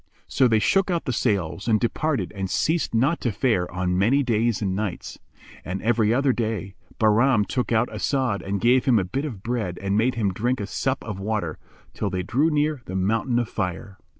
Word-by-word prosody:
So 130 - +3
they 115 -2 +3
shook 195 - +2
out 170 -2 -1
the 130 - -1
sails 100 -5 -1
and 110 -2 +3
departed 140 +5 -1
and 95 -1 -3
ceased 160 - 0
not 135 +9 +2
to 120 - 0
fare 105 -4 0
on 90 0 -1
many 130 +8 +3
days 115 -2 +1
and 95 -3 -1
nights; 100 -3 -4 0.4
and, 95 +2 -4
every 110 -1 +2
other 135 +2 +2
day, 110 -5 -3 0.2
Bahram 110 +1 +3
took 125 +2 -2
out 115 +1 +3
As'ad 110 +2 -1
and 100 +1 -3
gave 125 +3 +3
him 125 -4 +4
a 100 - +2
bit 135 +10 -3
of 110 -10 -7
bread 110 -7 -2
and 100 0 -1
made 120 +4 +2
him 105 -5 0
drink 120 +6 -1
a 100 - -2
sup 130 +6 -2
of 105 -3 -6
water, 100 -6 -3 0.3
till - - -2
they 95 -1 -2
drew 135 - +1
near 150 -2 0
the 95 - -6
Mountain 115 +6 0
of 120 -2 0
Fire. 95 +2 -4
110 Hz, 205 wpm, -24 LUFS, 100-130 Hz, 0.4 s, him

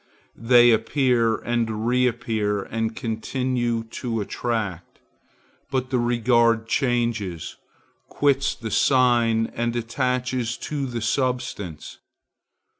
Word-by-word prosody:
They 120 0 +6
appear 115 0 +2
and 115 -2 -2
reappear 115 -4 0
and 115 +1 -3
continue 120 +1 -2 0.2
to 115 -3 -2
attract; 105 -5 -3 0.7
but 130 -1 -2
the 125 - +2
regard 120 -1 +2
changes, 115 - -1 0.5
quits 140 -2 +1
the 110 -2 -6
sign 120 -4 +3
and 120 0 -2
attaches 125 0 -1
to 145 -3 -4
the 120 -2 -4
substance. 120 - -3
120 Hz, 95 wpm, -23 LUFS, 115-125 Hz, 0.7 s, They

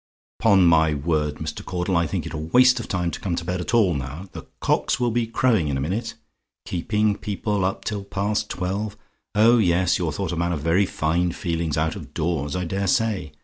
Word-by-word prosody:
"'Pon 100 -5 +5
my 80 -2 +4
word, 75 0 0
Mr. 75 -1 -6
Caudle, 90 +1 -2
I 85 -1 +2
think - - -3
it - - -6
a - - -3
waste 125 +12 +4
of 115 - -6
time 90 -2 -1
to - - -6
come 90 -3 -2
to 85 - -4
bed 90 +1 -2
at 105 - -1
all 100 -7 +4
now! 70 +6 -5
The - - -9
cocks - - +1
will 120 -1 +1
be 115 0 0
crowing 115 -7 +2
in 70 -2 -1
a - - -2
minute. 110 - -3 0.5
Keeping 105 +4 0
people 105 -1 -2
up 95 +1 -2
till 105 -2 -3
past 105 +2 -2
twelve. 100 +3 -3 0.4
Oh 115 +3 +6
yes! 90 -2 +2
you're - - -1
thought - - -3
a - - -2
man 85 +1 0
of 75 - -3
very 85 +5 +2
fine 85 +2 0
feelings 85 -3 -2
out 80 +1 0
of - - -10
doors, 80 -3 -1
I 90 0 -2
dare 95 +3 -2
say! 95 -7 0
90 Hz, 220 wpm, -23 LUFS, 80-105 Hz, 0.5 s, Oh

